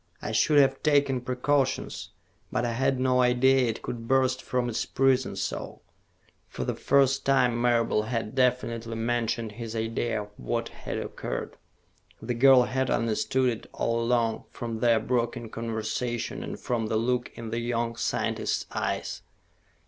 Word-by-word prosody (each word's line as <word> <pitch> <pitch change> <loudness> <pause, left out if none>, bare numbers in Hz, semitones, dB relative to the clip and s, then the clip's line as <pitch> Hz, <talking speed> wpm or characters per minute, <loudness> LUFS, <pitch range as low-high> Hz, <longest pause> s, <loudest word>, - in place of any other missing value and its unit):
I - - -4
should 150 - +3
have 135 -1 +4
taken 140 -4 +2
precautions. 130 +2 -1 0.4
But 125 -1 0
I 120 - 0
had 130 +2 +1
no 130 0 +3
idea 125 +1 +4
it 115 - -5
could 115 -1 -5
burst 130 0 +2
from 125 -1 -1
its 115 - -1
prison 130 -1 +1
so." - - -4 0.7
For - - -5
the - - -1
first 135 -1 +2
time 125 -3 +3
Marable 115 -3 +2
had 115 -2 -2
definitely 120 -3 0
mentioned 115 -1 -1
his 115 +1 -7
idea 115 -1 -1
of 105 - -14
what - - -2
had - - -6
occurred. - - -5 0.6
The 125 - -3
girl 130 +1 +6
had 130 +1 -1
understood 120 +3 +1
it 115 - -7
all 115 0 0
along, 115 -1 +1
from 115 -2 -5
their 115 -1 +4
broken 120 -1 -2
conversation 115 +1 -3
and - - -6
from 115 -3 -1
the 110 - 0
look 125 +2 0
in 115 -2 -7
the 115 - -1
young 115 0 -1
scientist's - - -1
eyes. - - -3
120 Hz, 155 wpm, -27 LUFS, 115-130 Hz, 0.7 s, girl